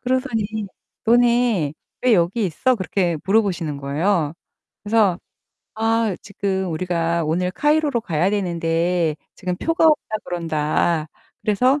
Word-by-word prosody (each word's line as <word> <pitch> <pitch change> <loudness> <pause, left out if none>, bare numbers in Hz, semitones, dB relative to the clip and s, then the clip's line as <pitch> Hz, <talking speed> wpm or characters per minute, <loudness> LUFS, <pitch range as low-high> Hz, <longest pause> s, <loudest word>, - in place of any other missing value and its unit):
그러더니 255 -3 0 0.6
"너네 235 -8 +3 0.3
왜 250 -3 +5
여기 190 +4 +1
있어?" 250 - +1
그렇게 185 -3 0
물어보시는 190 -7 +1
거예요. 150 +3 0 0.5
그래서 205 -4 +2 0.6
아 225 -3 +1
지금 195 -2 -2
우리가 170 0 0
오늘 180 +4 0
카이로로 295 -1 +2
가야 175 -4 0
되는데 170 -3 0 0.2
지금 180 -2 -3
표가 330 - +2
없다 300 -8 +2
그런다. 160 -1 0 0.4
그래서 250 +7 +2
190 Hz, 275 characters per minute, -21 LUFS, 170-230 Hz, 0.6 s, 왜